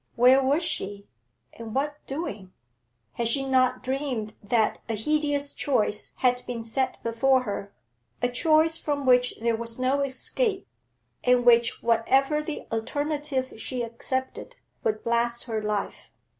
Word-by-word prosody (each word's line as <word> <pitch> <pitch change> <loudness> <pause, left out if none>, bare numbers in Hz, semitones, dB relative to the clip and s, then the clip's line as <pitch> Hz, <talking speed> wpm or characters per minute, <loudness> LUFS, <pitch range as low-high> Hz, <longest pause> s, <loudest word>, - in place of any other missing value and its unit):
Where 255 +3 +6
was 285 +6 +2
she, 200 - -3 0.5
and 225 0 -8
what 295 +2 -2
doing? 220 - -5 0.6
Had 235 - 0
she 270 +4 +2
not 255 -1 +2
dreamed 255 -5 -2
that 220 +1 +1
a 225 - 0
hideous 290 +4 0
choice 215 -6 0
had 250 -1 +2
been 235 -2 -4
set 255 +4 -1
before 255 +3 +2
her, 200 -3 -5 0.5
a - - +1
choice 315 +5 +3
from 290 -3 -2
which 250 -1 +4
there 230 0 +1
was 230 0 -1
no 260 +2 +1
escape, 385 - -1 0.6
and 250 -1 +3
which, 235 -1 +4
whatever 270 +6 +2
the 300 0 -6
alternative 285 +3 -2
she 250 -2 -3
accepted, 260 - -4 0.3
would 215 -1 -1
blast 235 0 +1
her 220 -3 -3
life? 210 -1 -3
255 Hz, 140 wpm, -26 LUFS, 230-280 Hz, 0.6 s, Where